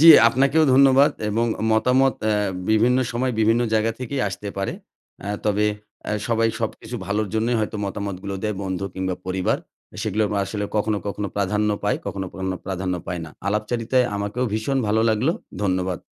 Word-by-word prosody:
জি, 165 Hz, -, +7 dB, 0.2 s
আপনাকেও 140 Hz, +6 st, +3 dB
ধন্যবাদ 135 Hz, +1 st, +6 dB, 0.2 s
এবং 115 Hz, +3 st, +1 dB, 0.3 s
মতামত 130 Hz, +4 st, +3 dB
অ্যা 110 Hz, -1 st, +2 dB, 0.4 s
বিভিন্ন 120 Hz, +4 st, +4 dB
সময়, 125 Hz, +1 st, 0 dB
বিভিন্ন 115 Hz, +2 st, +4 dB
জায়গা 110 Hz, +1 st, +2 dB
থেকেই 130 Hz, +2 st, -2 dB
আসতে 100 Hz, +2 st, -6 dB
পারে। 100 Hz, -, -1 dB, 0.5 s
আ -, -, -3 dB, 0.2 s
তবে 105 Hz, 0 st, +2 dB, 0.4 s
আ -, -, 0 dB, 0.2 s
সবাই 115 Hz, -1 st, +3 dB
সবকিছু 115 Hz, +1 st, -4 dB
ভালোর 105 Hz, 0 st, 0 dB
জন্যই 115 Hz, +2 st, +1 dB
হয়তো 110 Hz, 0 st, -2 dB
মতামতগুলো 100 Hz, 0 st, -4 dB
দেয়, 105 Hz, -1 st, -1 dB
বন্ধু 95 Hz, 0 st, -3 dB
কিংবা 95 Hz, -1 st, -2 dB
পরিবার, 95 Hz, 0 st, 0 dB, 0.4 s
আ -, -, -10 dB
সেগুলোও 105 Hz, -1 st, 0 dB
আসলে 105 Hz, +2 st, -3 dB
কখনো, 105 Hz, 0 st, +1 dB
কখনো 100 Hz, 0 st, -2 dB
প্রাধান্য 105 Hz, +2 st, +1 dB, 0.2 s
পায়, 105 Hz, -, +2 dB
কখনো, 95 Hz, -1 st, -3 dB
কখনো 95 Hz, -1 st, -3 dB
প্রাধান্য 95 Hz, -1 st, -2 dB
পায় 90 Hz, -1 st, -3 dB
না। 80 Hz, -, -10 dB, 0.2 s
আলাপচারিতায় 115 Hz, +4 st, +1 dB
আমাকেও 105 Hz, +5 st, -2 dB
ভীষণ 120 Hz, +5 st, 0 dB
ভালো 110 Hz, +2 st, +2 dB
লাগলো 125 Hz, +10 st, +2 dB, 0.3 s
ধন্যবাদ। 95 Hz, -2 st, 0 dB
105 Hz, 165 wpm, -23 LUFS, 100-120 Hz, 0.5 s, জি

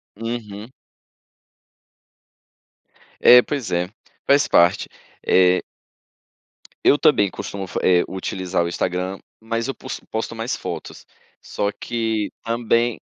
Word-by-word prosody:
Uhum. 110 Hz, -1 st, -6 dB, 2.5 s
É, 125 Hz, 0 st, +9 dB
pois 135 Hz, -2 st, -4 dB
é, 90 Hz, +1 st, 0 dB, 0.4 s
faz 140 Hz, 0 st, +4 dB
parte, 85 Hz, +1 st, +4 dB, 0.4 s
eh 90 Hz, 0 st, +4 dB, 1.2 s
eu 145 Hz, -, +5 dB
também 105 Hz, -10 st, +3 dB
costumo 95 Hz, +1 st, -6 dB
fa -, -, -4 dB
eh, 90 Hz, -1 st, +4 dB
utilizar 95 Hz, -1 st, -2 dB
o -, -, -2 dB
Instagram, 90 Hz, +2 st, -2 dB, 0.2 s
mas 115 Hz, +1 st, -2 dB
eu 135 Hz, -, -3 dB
pos 130 Hz, -, -7 dB
posto 110 Hz, +1 st, -3 dB
mais 115 Hz, +2 st, -3 dB
fotos, -, -, -7 dB, 0.4 s
só 100 Hz, 0 st, -2 dB
que 110 Hz, -1 st, -2 dB
também 115 Hz, 0 st, 0 dB
110 Hz, 110 wpm, -21 LUFS, 95-115 Hz, 2.5 s, É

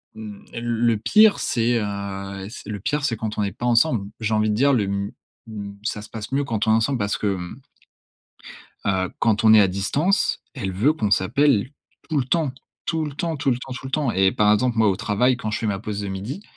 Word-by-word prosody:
hem, 105 Hz, -2 st, -9 dB
le 115 Hz, -1 st, +1 dB
pire, 210 Hz, -, +5 dB
c'est, 120 Hz, 0 st, +1 dB
heu, 100 Hz, -1 st, -5 dB
c'est 110 Hz, -, -10 dB
le 105 Hz, -2 st, -4 dB
pire 145 Hz, +8 st, -1 dB
c'est 115 Hz, -6 st, -1 dB
quand 110 Hz, -1 st, -4 dB
on -, -, +1 dB
n'est 100 Hz, -, -1 dB
pas 120 Hz, -, -6 dB
ensemble. 120 Hz, -3 st, +3 dB
J'ai 110 Hz, 0 st, 0 dB
envie 110 Hz, 0 st, +2 dB
de 105 Hz, -, +1 dB
dire, 140 Hz, +4 st, +3 dB
le 110 Hz, -5 st, +2 dB
m 100 Hz, +1 st, -2 dB, 0.4 s
m 100 Hz, -2 st, -7 dB
ça 105 Hz, -2 st, -3 dB
se -, -, -12 dB
passe 110 Hz, +2 st, -7 dB
mieux 140 Hz, +1 st, +1 dB
quand 110 Hz, -5 st, -1 dB
on -, -, +5 dB
est -, -, +5 dB
ensemble 120 Hz, +4 st, +1 dB
parce 100 Hz, 0 st, -1 dB
que, 105 Hz, -, -2 dB
hem 90 Hz, +8 st, -8 dB, 1.3 s
Heu, 95 Hz, -2 st, 0 dB
quand 110 Hz, -1 st, +1 dB
on 110 Hz, 0 st, +8 dB
est 110 Hz, -, +8 dB
à 100 Hz, -, +4 dB
distance, 145 Hz, -, +1 dB
elle 95 Hz, -8 st, -3 dB
veut 115 Hz, +12 st, +3 dB
qu'on 110 Hz, -9 st, -2 dB
s'appelle 120 Hz, +4 st, +2 dB, 0.4 s
tout 155 Hz, -3 st, 0 dB
le 130 Hz, -, +1 dB
temps. 150 Hz, -1 st, 0 dB, 0.3 s
Tout 160 Hz, -1 st, 0 dB
le 145 Hz, -, -6 dB
temps, 165 Hz, +1 st, -2 dB
tout 135 Hz, -, 0 dB
le 120 Hz, -, +1 dB
temps, 130 Hz, +1 st, -8 dB
tout 130 Hz, +1 st, -7 dB
le -, -, -7 dB
temps 145 Hz, -3 st, 0 dB
et 95 Hz, -2 st, +3 dB
par 105 Hz, 0 st, +4 dB
exemple, 120 Hz, +2 st, +1 dB
moi, 110 Hz, -1 st, +4 dB
au 95 Hz, -, +1 dB
travail, 125 Hz, +5 st, +1 dB
quand 110 Hz, -, -3 dB
je 110 Hz, -, -2 dB
fais 115 Hz, -, -3 dB
ma 100 Hz, -2 st, -1 dB
pause 105 Hz, +1 st, -4 dB
de 100 Hz, -, -4 dB
midi, 105 Hz, -, -5 dB
110 Hz, 245 wpm, -23 LUFS, 100-130 Hz, 1.3 s, on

